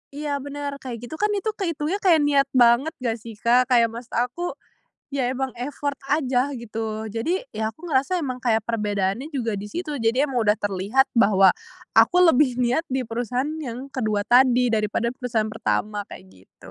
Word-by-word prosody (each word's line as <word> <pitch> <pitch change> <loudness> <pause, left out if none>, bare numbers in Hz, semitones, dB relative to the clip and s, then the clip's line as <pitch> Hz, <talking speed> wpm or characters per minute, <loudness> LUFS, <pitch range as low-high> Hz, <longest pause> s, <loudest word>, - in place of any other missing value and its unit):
Iya, 290 -1 -2
bener, 285 +1 -5
kayak 245 -3 -7
gitu 240 +6 -7
kan, 420 - +3
itu 410 +2 -1
keitungnya 335 0 -2
kayak 340 -7 +4
niat 280 -1 +3
banget 245 +5 +4
nggak 235 -2 -1
sih, 225 0 -10
Kak? 245 +2 +4
Kayak 235 -3 +3
maksud 235 +2 -8
aku 250 +9 -2 0.5
ya, 275 -3 -1
emang 265 +1 -2
effort 285 +2 -3 0.2
aja, 270 -2 +1
gitu. 220 -1 -4
Jadi 230 - -1 0.2
ya, 220 0 -1
aku 315 - -23
ngerasa 300 +5 +1
emang 260 -5 -3
kayak 225 -2 +3
perbedaannya 210 +4 -1
juga 230 -5 -1
di 200 - -6
situ, 305 +6 -4
jadi 245 +5 +1
emang 245 -4 0
udah 210 - +5
terlihat 205 +6 +1
bahwa 195 -3 +6 0.5
aku 360 - +5
lebih 260 -3 +3
niat 250 +6 +1
di 265 - +1
perusahaan 245 +4 -2 0.2
yang 250 +2 -6
ke-2 215 -6 -1
tadi, 250 0 +5
daripada 220 +1 0
perusahaan 240 -4 -2
pertama, 215 -1 -2
kayak 95 - -11 0.2
gitu. - - -16
250 Hz, 175 wpm, -23 LUFS, 225-285 Hz, 0.5 s, bahwa